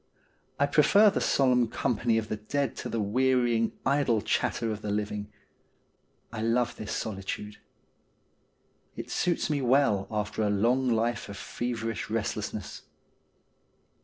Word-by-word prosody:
I 140 Hz, -, +4 dB
prefer 200 Hz, +9 st, +5 dB
the -, -, -1 dB
solemn 125 Hz, -3 st, +3 dB
company 115 Hz, 0 st, 0 dB
of 110 Hz, -1 st, -1 dB
the 110 Hz, -, -3 dB
dead 135 Hz, +4 st, -2 dB
to -, -, -5 dB
the 115 Hz, -, -2 dB
wearying, 120 Hz, +1 st, +2 dB
idle 135 Hz, -4 st, +2 dB
chatter 115 Hz, -, 0 dB
of 105 Hz, -1 st, -5 dB
the 105 Hz, -, -4 dB
living. 105 Hz, 0 st, -3 dB, 1.0 s
I 110 Hz, -, -4 dB
love 120 Hz, +2 st, +1 dB
this 105 Hz, -, -6 dB
solitude. 105 Hz, 0 st, -4 dB, 1.4 s
It -, -, -7 dB
suits 175 Hz, -, 0 dB
me 145 Hz, -2 st, 0 dB
well 125 Hz, -6 st, +3 dB
after 105 Hz, 0 st, -2 dB
a 105 Hz, -, +2 dB
long 120 Hz, +6 st, +2 dB
life 115 Hz, 0 st, 0 dB
of 100 Hz, -, -7 dB
feverish 115 Hz, -4 st, -4 dB
restlessness. -, -, -3 dB
115 Hz, 135 wpm, -28 LUFS, 105-130 Hz, 1.4 s, prefer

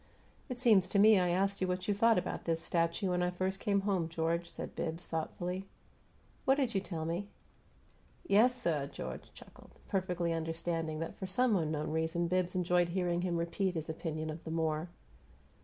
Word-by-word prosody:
"It 250 Hz, -, -4 dB
seems 215 Hz, -7 st, +4 dB
to 200 Hz, -, +1 dB
me 210 Hz, 0 st, +7 dB
I 180 Hz, -1 st, +2 dB
asked 195 Hz, +3 st, +1 dB
you 185 Hz, -, +2 dB
what 180 Hz, 0 st, -2 dB
you 205 Hz, -, +3 dB
thought 225 Hz, +2 st, +4 dB
about 180 Hz, -, -2 dB
this 165 Hz, -1 st, +1 dB
'statue' 170 Hz, +3 st, 0 dB
when 180 Hz, 0 st, +1 dB
I 180 Hz, -, +2 dB
first 185 Hz, +2 st, -2 dB
came 200 Hz, -3 st, +1 dB
home, 190 Hz, -5 st, 0 dB
George," 170 Hz, +1 st, -1 dB
said -, -, -7 dB
Bibbs, 165 Hz, +2 st, -3 dB
thoughtfully. 180 Hz, +4 st, -3 dB, 0.8 s
"What 265 Hz, -, +4 dB
did 265 Hz, -5 st, 0 dB
you 195 Hz, -, +1 dB
tell 165 Hz, -5 st, -4 dB
me?" 175 Hz, +5 st, -2 dB, 1.0 s
"Yessuh!" 200 Hz, -, +3 dB
George -, -, -7 dB
chuckled, -, -, -15 dB
perfectly 180 Hz, -3 st, 0 dB
understanding 165 Hz, -1 st, -2 dB
that 165 Hz, -, -5 dB
for 190 Hz, -, -4 dB
some 230 Hz, +4 st, +2 dB
unknown 155 Hz, -4 st, -1 dB
reason 160 Hz, +2 st, 0 dB
Bibbs 185 Hz, +1 st, 0 dB
enjoyed 175 Hz, -1 st, +2 dB
hearing 175 Hz, -1 st, 0 dB
him 175 Hz, -1 st, 0 dB
repeat 175 Hz, +2 st, -1 dB
his 160 Hz, 0 st, -4 dB
opinion 155 Hz, -1 st, -4 dB
of 160 Hz, +2 st, -8 dB
the -, -, -6 dB
Moor. 160 Hz, 0 st, -1 dB
175 Hz, 180 wpm, -33 LUFS, 165-195 Hz, 1.0 s, me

